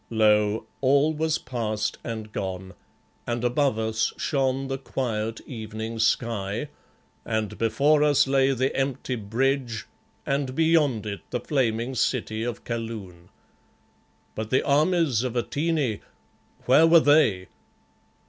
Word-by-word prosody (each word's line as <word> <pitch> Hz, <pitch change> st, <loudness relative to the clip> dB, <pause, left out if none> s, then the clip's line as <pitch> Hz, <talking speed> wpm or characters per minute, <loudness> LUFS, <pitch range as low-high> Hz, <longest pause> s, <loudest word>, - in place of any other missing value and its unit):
Lo! 105 Hz, -1 st, +2 dB, 0.2 s
all 140 Hz, +3 st, +3 dB
was 155 Hz, 0 st, 0 dB
past 110 Hz, -4 st, -3 dB
and 110 Hz, -2 st, -6 dB
gone, 95 Hz, -2 st, -5 dB, 0.5 s
and 120 Hz, 0 st, -2 dB
above 125 Hz, 0 st, +1 dB
us 110 Hz, 0 st, 0 dB
shone 135 Hz, -2 st, 0 dB
the 135 Hz, 0 st, -3 dB
quiet 115 Hz, -5 st, -3 dB
evening 110 Hz, -1 st, -6 dB
sky, 110 Hz, +2 st, 0 dB, 0.5 s
and 110 Hz, -2 st, -2 dB
before 140 Hz, +7 st, +3 dB
us 145 Hz, -2 st, +4 dB
lay 135 Hz, 0 st, +3 dB
the 130 Hz, 0 st, 0 dB
empty 135 Hz, -1 st, -2 dB
bridge, 120 Hz, +2 st, -1 dB, 0.4 s
and 135 Hz, -2 st, -1 dB
beyond 155 Hz, -8 st, +2 dB
it 100 Hz, -2 st, -5 dB
the 125 Hz, -, -2 dB
flaming 120 Hz, -2 st, -1 dB
city 115 Hz, -3 st, -1 dB
of 120 Hz, -1 st, -4 dB
Kaloon. 110 Hz, -7 st, -6 dB, 1.0 s
But 110 Hz, 0 st, -5 dB
the 130 Hz, -, +2 dB
armies 150 Hz, -, +2 dB
of 125 Hz, -1 st, -3 dB
Atene, 140 Hz, -2 st, -1 dB, 0.7 s
where 150 Hz, +6 st, +6 dB
were 165 Hz, 0 st, +7 dB
they? 145 Hz, -, +3 dB
120 Hz, 120 wpm, -25 LUFS, 110-140 Hz, 1.0 s, were